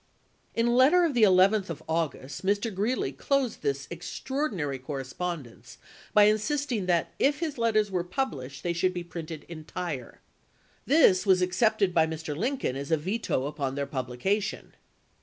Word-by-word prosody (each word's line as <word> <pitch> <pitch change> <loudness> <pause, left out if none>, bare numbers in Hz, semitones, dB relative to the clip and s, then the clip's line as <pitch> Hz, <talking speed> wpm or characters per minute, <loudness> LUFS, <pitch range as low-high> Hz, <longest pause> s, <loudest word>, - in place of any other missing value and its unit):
In 230 - +2
a 240 - +2
letter 280 +9 +6
of 320 - 0
the 240 - +1
11th 195 0 +5
of 160 -1 -6
August, 155 -4 -3
Mr. 205 +3 0
Greeley 215 +7 -1
laa. - - -19
closed 275 -5 0
this 140 -1 -2
extraordinary 175 - -3
correspondence 135 0 -6 0.3
by 210 - +6
insist 265 +8 +1
ing 205 -6 -1
that 170 -2 +1
if 285 +2 +2
his 310 -6 -3
letters 215 -3 +2
were 180 -2 0
published 140 - -4
they 175 - 0
should 185 +2 0
be 175 - -3
printed 165 -2 -7
entire. 155 -4 -6 0.7
This 255 - +5
was 185 -1 +5
accepted 200 +1 +2
by 160 -1 +4
Mr. 160 -1 -5
Lincoln 240 - -1
as 140 +1 -5
a 160 - +3
veto 180 - -1
upon 140 -2 -3
their 140 0 -1
publication. 140 - -2
180 Hz, 160 wpm, -28 LUFS, 150-220 Hz, 0.7 s, letter